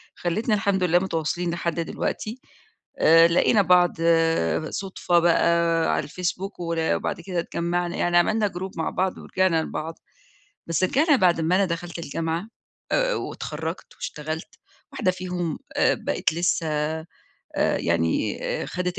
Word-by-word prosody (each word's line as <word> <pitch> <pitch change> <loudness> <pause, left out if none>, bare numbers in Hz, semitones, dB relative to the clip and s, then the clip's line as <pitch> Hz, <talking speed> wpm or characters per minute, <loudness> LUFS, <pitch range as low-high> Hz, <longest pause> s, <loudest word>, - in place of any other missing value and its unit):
خلِّتنا 210 +6 0
الحمد 200 -2 +1
لله 175 0 +4
متواصلين 175 -1 -2
لحد 170 0 -2
دلوقتي، 215 +7 -3 0.6
آآ 165 +1 +7
لقينا 180 +5 +4
بعض 180 -1 +5 0.8
صُدفة 185 -3 0
بقى 170 -1 +3
على - - -2
الFacebook 180 +4 -4
ور 170 -1 -2 0.2
وبعد - - -3
كده 180 0 -3
اتجمّعنا، 170 +1 -2
يعني 175 0 +2
عملنا 210 +5 +3
group 185 +1 -6
مع 160 - -1
بعض 190 0 -1
ورجعنا 185 -4 +1
لبعض، 160 +1 -5 0.7
بس 165 +2 0
رجعنا 290 - +4
بعد 175 -6 +3
ما 165 +3 +2
أنا 195 +1 +3
دخلت 170 0 -4
الجامعة 165 +4 -3 0.4
آآ - - +2
واتخرَّجت - - -5
واشتغلت، 155 +2 -6 0.3
واحدة 185 - +1
فيهم 180 -3 -4 0.2
آآ - - +4
بقت - - -1
لسّه 170 0 0
آآ 155 +1 -2 0.7
يعني 85 -1 0
آآ - - -2
خدت 180 +1 -3
175 Hz, 135 wpm, -24 LUFS, 165-185 Hz, 0.8 s, آآ